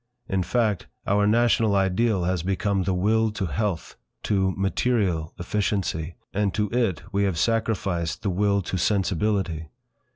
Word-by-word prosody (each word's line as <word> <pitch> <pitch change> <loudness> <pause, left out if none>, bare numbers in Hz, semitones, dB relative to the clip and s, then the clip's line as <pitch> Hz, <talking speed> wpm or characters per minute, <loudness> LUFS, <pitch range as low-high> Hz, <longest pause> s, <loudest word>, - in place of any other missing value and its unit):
In 95 -1 0
fact, 105 +1 0 0.2
our 100 +1 +2
national 115 -1 +3
ideal 95 +1 +2
has 90 -1 0
become 95 +2 0
the 95 - +1
Will 110 +4 +2
to 100 - -2
Health, 95 0 -3 0.3
to 95 -2 +1
Material 95 -5 0
Efficiency, 90 -4 -2 0.2
and 100 -1 0
to 105 -1 0
it 115 -8 0
we 100 0 +1
have 95 -4 -1
sacrificed 95 -4 0
the 100 - 0
Will 100 +1 +1
to 90 +1 -3
Sensibility. 95 -4 0
100 Hz, 140 wpm, -25 LUFS, 90-105 Hz, 0.3 s, national